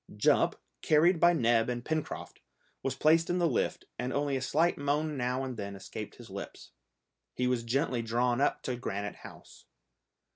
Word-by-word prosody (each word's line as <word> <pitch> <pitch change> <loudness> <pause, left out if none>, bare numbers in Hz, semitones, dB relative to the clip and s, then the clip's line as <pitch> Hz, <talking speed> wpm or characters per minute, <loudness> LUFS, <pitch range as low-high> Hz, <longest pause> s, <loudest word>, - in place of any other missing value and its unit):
Jup, - - +3 0.2
carried 165 +3 +4
by 175 +1 +6
Neb 115 -5 +3
and 120 -1 -3
Pencroft, 155 -1 -4 0.4
was 135 -1 -2
placed 160 +3 +3
in 175 - +1
the 175 -1 +3
lift, 135 - -1
and 125 +1 -2
only 145 0 0
a 130 - -1
slight 160 +6 +2
moan 150 +2 -1
now 125 0 -1
and 130 -3 -5
then 100 -1 -5
escaped 95 - -7
his - - -13
lips. - - -8 0.6
He 125 - 0
was 125 -1 +1
gently 125 +1 0
drawn 120 +2 +1
up - - +1
to 125 - -2
Granite 100 -3 -4
House. - - -13
130 Hz, 175 wpm, -30 LUFS, 120-155 Hz, 0.6 s, by